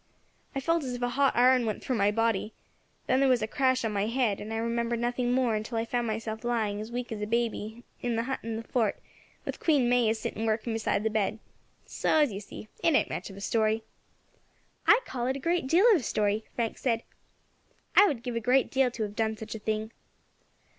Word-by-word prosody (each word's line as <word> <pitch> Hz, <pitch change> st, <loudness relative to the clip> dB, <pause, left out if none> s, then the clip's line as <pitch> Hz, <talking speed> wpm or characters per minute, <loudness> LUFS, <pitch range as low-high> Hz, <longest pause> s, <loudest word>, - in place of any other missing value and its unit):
I -, -, 0 dB
felt 330 Hz, +3 st, +1 dB
as 255 Hz, -2 st, -4 dB
if 245 Hz, -, -7 dB
a 245 Hz, -, +1 dB
hot 275 Hz, +2 st, +2 dB
iron 250 Hz, +1 st, +5 dB
went 215 Hz, -, -3 dB
through 255 Hz, -, -1 dB
my 200 Hz, -1 st, +3 dB
body, 225 Hz, -1 st, 0 dB, 0.5 s
then 260 Hz, -, +2 dB
there 275 Hz, -1 st, +4 dB
was 250 Hz, -3 st, +3 dB
a -, -, -1 dB
crash 260 Hz, -1 st, +1 dB
on 220 Hz, -, -1 dB
my 200 Hz, +1 st, 0 dB
head, 230 Hz, -4 st, 0 dB
and 215 Hz, -, -6 dB
I 225 Hz, -, -2 dB
remember 235 Hz, +1 st, -1 dB
nothing 245 Hz, +1 st, -1 dB
more 250 Hz, -2 st, +2 dB
until 215 Hz, +2 st, -3 dB
I 225 Hz, -, 0 dB
found 240 Hz, 0 st, -1 dB
myself 220 Hz, 0 st, -4 dB
lying, 220 Hz, -4 st, -1 dB
as 220 Hz, +2 st, -7 dB
weak 245 Hz, 0 st, -4 dB
as 215 Hz, -2 st, -4 dB
a 210 Hz, -, -2 dB
baby, 230 Hz, 0 st, -2 dB, 0.2 s
in 240 Hz, -1 st, -1 dB
the 230 Hz, -, 0 dB
hut 265 Hz, +2 st, -3 dB
in 225 Hz, 0 st, -4 dB
the 225 Hz, -, -5 dB
fort, 225 Hz, -3 st, 0 dB, 0.5 s
with -, -, -5 dB
Queen 285 Hz, -7 st, +3 dB
May 245 Hz, -2 st, +3 dB
a 220 Hz, -, +1 dB
sitting 220 Hz, 0 st, -3 dB
working 220 Hz, +1 st, 0 dB
beside 220 Hz, -2 st, 0 dB
the 220 Hz, -, 0 dB
bed. 215 Hz, 0 st, 0 dB, 0.5 s
So, -, -, 0 dB
as 295 Hz, -5 st, +3 dB
you 195 Hz, -, -4 dB
see, 210 Hz, +1 st, -10 dB, 0.2 s
it 330 Hz, -, +4 dB
ain't -, -, +2 dB
much -, -, -4 dB
of 195 Hz, -, -11 dB
a -, -, -9 dB
story." 220 Hz, +1 st, +1 dB, 1.0 s
"I 450 Hz, +3 st, +7 dB
call 245 Hz, -2 st, -3 dB
it 260 Hz, -, 0 dB
a -, -, -4 dB
great 335 Hz, 0 st, 0 dB
deal 345 Hz, -, +4 dB
of -, -, +5 dB
a -, -, -8 dB
story," 210 Hz, 0 st, 0 dB
Frank 230 Hz, -2 st, -2 dB
said; 230 Hz, -3 st, 0 dB, 0.9 s
"I 410 Hz, -, +8 dB
would 255 Hz, -9 st, -2 dB
give 245 Hz, -2 st, -4 dB
a -, -, +1 dB
great 250 Hz, +3 st, +2 dB
deal 265 Hz, -1 st, +3 dB
to 235 Hz, -2 st, -4 dB
have 205 Hz, -1 st, -5 dB
done 220 Hz, 0 st, 0 dB
such 220 Hz, 0 st, -7 dB
a 220 Hz, -, -6 dB
thing." 215 Hz, +1 st, -2 dB
230 Hz, 235 wpm, -28 LUFS, 220-255 Hz, 1.0 s, I